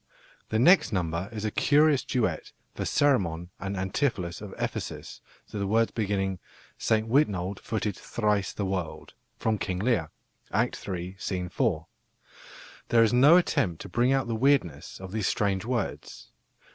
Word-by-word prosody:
The 110 - 0
next 175 +4 +5
number 90 -1 -2
is 110 -1 -5
a 110 - -1
curious 145 0 +4
duet 110 -11 -1 0.2
for - - -4
Ceremon 90 - +1
and 100 0 -4
Antipholus 95 - -1
of - - -7
Ephesus - - -5 0.3
to 105 - -4
the 100 - -1
words 115 +3 +2
beginning 95 -4 -1 0.4
"Saint 110 0 +1
Witnold 100 -8 +1
footed 105 -3 -2
thrice 105 -4 -1
the 100 - -3
world," 85 -5 -4 0.2
from 110 -2 0
King 90 -1 -2
Lear 100 -6 +1 0.4
(Act - - -1
iii., 90 +1 -5
Scene 90 -2 -3
4). 90 - 0 1.0
There 115 -1 +5
is 115 - +2
no 140 +8 +7
attempt 90 - +1
to 100 - -9
bring 120 +7 +2
out 135 -2 +2
the 115 - -2
weirdness 110 - +1
of 95 -1 -8
these 110 -2 -1
strange 100 -1 0
words. 120 -4 -4
105 Hz, 155 wpm, -27 LUFS, 90-120 Hz, 1.0 s, no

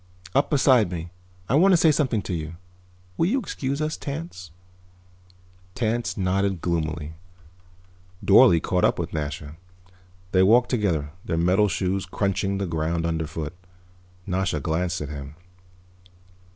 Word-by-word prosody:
"Up 140 - +2
beside 130 - +4
me. 85 -1 -5 0.4
I - - -1
want 185 +7 +5
to - - +6
say 160 -1 +5
something 130 -8 0
to 95 - -4
you. 80 0 -4 0.6
Will 165 - +2
you 240 +8 +1
excuse 140 - -3
us, 155 0 -2
Tance?" 140 - -6 1.3
Tance 120 -1 -1
nodded 95 0 0
gloomily. 80 -2 -2 1.1
Dorle 100 -3 +7
caught 90 +2 -1
up - - +3
with 85 -1 -4
Nasha. 75 0 -5 0.7
They 95 - +4
walked 120 +6 +4
together, 85 - 0
their 80 - -2
metal 90 +5 +3
shoes 95 -1 -1
crunching 100 +1 -1
the 100 - -2
ground 80 0 -1
underfoot. 80 -1 -3 0.7
Nasha 90 -4 -1
glanced 85 +3 -1
at 75 - -5
him. 70 0 -8
90 Hz, 135 wpm, -24 LUFS, 80-115 Hz, 1.3 s, Dorle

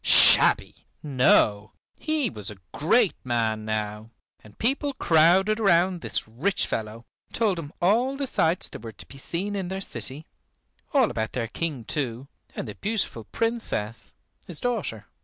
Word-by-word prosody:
Shabby! - - +6 0.2
No, 115 -7 +3 0.2
he 310 -7 -1
was 105 -2 -7
a 105 - -9 0.2
great 195 +7 +3
man 115 -3 -1
now, 105 0 -3 0.3
and 105 -1 -17
people 275 +4 0
crowded 185 +5 +4
round 180 -3 +3
this - - -1
rich 140 - -1
fellow, 110 +2 -5 0.3
told 210 -6 +1
him 145 -3 -7
all 240 +9 +2
the 280 - -2
sights 170 -9 +1
there - - -10
were 115 -1 -8
to - - -13
be 135 - -12
seen 190 +8 -2
in 190 -2 -3
their 190 +1 -4
city, 150 -5 -2 0.7
all 265 -6 +3
about 110 -1 -3
their 120 -3 -2
King 145 -3 -4
too, 130 -2 -3 0.3
and - - -5
the 105 - -6
beautiful 200 - -2
Princess, 225 - -3 0.3
his 165 - -5
daughter. 220 - -3
160 Hz, 155 wpm, -25 LUFS, -, 0.7 s, Shabby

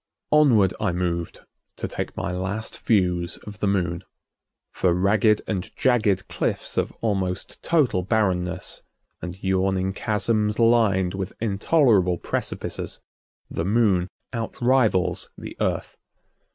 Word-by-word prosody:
Onward 120 -11 +5
I 105 -4 +1
moved 85 -1 -2 0.3
to - - -4
take - - -5
my 85 - -2
last 95 +4 -4
views 90 -5 +1
of 105 -1 -9
the 105 - 0
Moon. 90 -3 0 0.7
For 90 -2 +1
ragged 105 +3 +3
and 95 -4 -3
jagged 110 -7 +2
cliffs - - -2
of - - 0
almost 95 -5 -2
total 145 - +2
barrenness, 90 -3 -1 0.4
and 90 0 -6
yawning 95 0 +1
chasms 105 0 0
lined 110 -6 +3
with 95 0 -4
intolerable 105 - +3
precipices, - - -4 0.5
the 80 - -3
Moon 100 -3 +2 0.3
outrivals 115 -4 +1
the - - -8
Earth. - - -1
95 Hz, 115 wpm, -24 LUFS, 90-110 Hz, 0.7 s, Onward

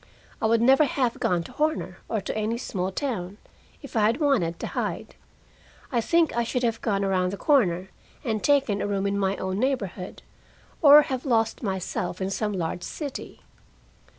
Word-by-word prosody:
I 220 - +2
would 230 +1 +3
never 270 +4 +6
have 250 -3 -1
gone 175 -2 +1
to - - -11
Horner, 300 - -1
or 220 - -1
to - - -4
any 220 +2 -1
small 190 -6 -3
town, 205 -6 -3 0.5
if 280 - -10
I - - +3
had 235 +6 0
wanted 235 - +1
to - - -4
hide. - - -3 0.8
I 240 -3 +1
think 335 +3 +2
I 235 - +2
should 250 +2 -2
have 230 -1 0
gone 200 -3 0
around 185 -2 +1
the 200 - -5
corner 190 - +2 0.3
and 220 -3 -2
taken 270 -8 +2
a - - -1
room 200 -1 -1
in 200 0 0
my 195 0 0
own 190 +1 -3
neighborhood, 210 -8 -2 0.6
or 295 -1 +9
have 260 -3 -3
lost 225 -4 +1
myself 185 -3 -3
in 190 0 -2
some 210 +1 -1
large 175 -1 -3
city. 285 - -7
220 Hz, 180 wpm, -25 LUFS, 190-260 Hz, 0.8 s, or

